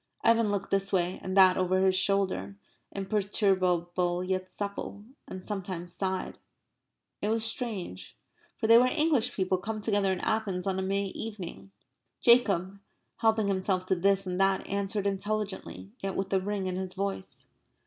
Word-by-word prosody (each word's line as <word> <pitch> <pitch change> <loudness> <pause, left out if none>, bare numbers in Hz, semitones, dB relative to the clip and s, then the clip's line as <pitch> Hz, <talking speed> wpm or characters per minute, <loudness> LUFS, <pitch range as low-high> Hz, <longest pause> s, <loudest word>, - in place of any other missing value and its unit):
Evan 230 -1 +4
looked 200 -1 -2
this 195 0 +1
way 180 -1 0
and 185 +1 -3
that 185 -1 +7
over 185 0 +2
his 190 -1 +4
shoulder; 185 - +1 0.4
imperturbable 185 -3 0
yet 185 0 -2
supple; 200 0 -5 0.2
and 185 -1 -7
sometimes 185 -4 -5
sighed. 190 0 -3 0.8
It 210 - 0
was 225 0 +1
strange. 225 - -3 0.4
For - - -2
they 230 +1 +8
were 250 - +4
English 300 -3 +2
people 185 -1 0
come 215 +3 -4
together 205 -2 +1
in 185 - -1
Athens 200 -5 -1
on 190 -1 0
a - - 0
May 195 +1 0
evening. 180 - -7 0.5
Jacob, 200 -6 +3 0.4
helping 220 -2 +2
himself 190 -1 0
to 190 - +1
this 195 +2 +2
and 180 +1 -1
that, 195 0 +2
answered 200 +1 -2
intelligently, 200 0 -3
yet 195 0 -3
with 195 0 -2
a 190 - +4
ring 200 0 -2
in 185 -1 -2
his 185 -1 -5
voice. 195 -1 -4
195 Hz, 160 wpm, -29 LUFS, 185-205 Hz, 0.8 s, they